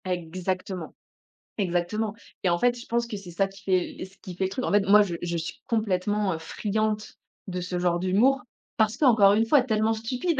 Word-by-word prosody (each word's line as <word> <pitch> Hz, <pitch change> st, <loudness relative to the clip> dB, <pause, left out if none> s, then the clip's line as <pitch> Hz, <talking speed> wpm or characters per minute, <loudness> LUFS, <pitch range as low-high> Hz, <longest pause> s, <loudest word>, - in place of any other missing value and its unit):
Exactement. 180 Hz, 0 st, -3 dB, 0.6 s
Exactement. 195 Hz, +3 st, 0 dB, 0.3 s
Et 185 Hz, -, +3 dB
en 175 Hz, 0 st, +1 dB
fait 245 Hz, +2 st, +2 dB
je 235 Hz, -, -10 dB
pense 235 Hz, 0 st, 0 dB
que 220 Hz, -3 st, -5 dB
c'est 190 Hz, -3 st, -10 dB
ça 195 Hz, +3 st, +1 dB
qui 195 Hz, 0 st, -15 dB
fait 185 Hz, -2 st, 0 dB
le -, -, -5 dB
ce 190 Hz, +1 st, -18 dB
qui 180 Hz, -, -8 dB
fait 190 Hz, -, -2 dB
le 190 Hz, -, +1 dB
truc, 225 Hz, +7 st, -4 dB
en -, -, -1 dB
fait, 205 Hz, +1 st, +5 dB
moi 210 Hz, +1 st, +8 dB
je 185 Hz, -5 st, -1 dB
je 170 Hz, -1 st, -1 dB
suis 165 Hz, +1 st, -6 dB
complètement, 205 Hz, -2 st, 0 dB
heu, -, -, -3 dB
friande 215 Hz, +5 st, -2 dB, 0.3 s
de 180 Hz, -1 st, -3 dB
ce 180 Hz, 0 st, -3 dB
genre 175 Hz, -1 st, +2 dB
d'humour 215 Hz, +9 st, +3 dB, 0.4 s
parce 220 Hz, +1 st, +2 dB
qu'encore 225 Hz, -9 st, +6 dB
une 220 Hz, +2 st, +3 dB
fois 270 Hz, +4 st, +5 dB
tellement 220 Hz, -2 st, +1 dB
stupide. 250 Hz, +8 st, -2 dB
200 Hz, 215 wpm, -26 LUFS, 180-220 Hz, 0.6 s, moi